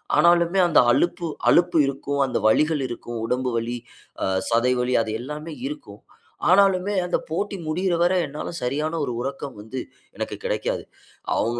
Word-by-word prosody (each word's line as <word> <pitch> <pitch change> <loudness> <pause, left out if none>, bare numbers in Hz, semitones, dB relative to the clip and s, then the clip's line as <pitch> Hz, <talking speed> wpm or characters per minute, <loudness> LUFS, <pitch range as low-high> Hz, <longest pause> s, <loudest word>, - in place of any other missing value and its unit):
ஆனாலுமே 170 +2 +4
அந்த 170 - +5
அலுப்பு 175 +5 +1 0.2
அலுப்பு 175 0 +4
இருக்கும் 140 +1 -3
அந்த 130 - -1
வலிகள் 150 +6 +3
இருக்கும். 120 -1 -6
உடம்பு 125 +2 -1
வலி, 115 +1 -2 0.5
அ - - +2 0.2
சதை 120 +2 +3
வலி 125 +1 +1
அது 110 - -4
எல்லாமே 150 +5 -6
இருக்கும். 110 -8 -9 0.5
ஆனாலுமே 195 +1 +4
அந்த 180 - +1
போட்டி 200 +5 -2
முடியிற 175 +3 0
வர 175 +1 +3
என்னால 150 +2 -6
சரியான 150 +6 -1
1 125 - -3
உறக்கம் 135 0 -5
வந்து 120 +5 -6 0.4
எனக்கு - - -3
கெடைக்காது. - - -1 0.5
அவங்க 120 +1 0
150 Hz, 150 wpm, -23 LUFS, 125-175 Hz, 0.5 s, அந்த